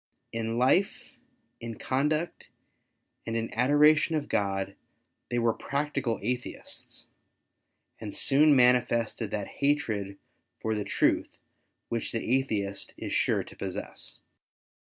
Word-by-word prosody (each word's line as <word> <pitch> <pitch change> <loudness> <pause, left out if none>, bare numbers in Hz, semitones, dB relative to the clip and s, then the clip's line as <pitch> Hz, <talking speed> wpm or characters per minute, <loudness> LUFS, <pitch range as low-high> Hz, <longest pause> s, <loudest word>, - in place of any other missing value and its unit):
In 115 0 -2
life, 155 +11 +2 0.5
in 115 -1 -6
conduct, 150 +5 -1 0.8
and 115 0 -1
in 115 0 -3
adoration 150 +6 +4
of 150 -2 -2
God, 100 -1 -1 0.5
they 120 - -1
were 115 -1 +2
practical 140 -4 -2
Atheists, 125 +3 -4 0.9
and 105 -2 -6
soon 145 +2 +5
manifested 125 -3 +3
that 100 -1 -3 0.2
hatred 110 -9 0 0.4
for 110 - -1
the 105 -1 -1
truth - - +1 0.5
which 115 -1 -2
the 115 +2 +1
Atheist 100 -7 -2
is - - -5
sure - - +2
to - - -13
possess. - - -6
120 Hz, 115 wpm, -28 LUFS, 110-140 Hz, 0.9 s, soon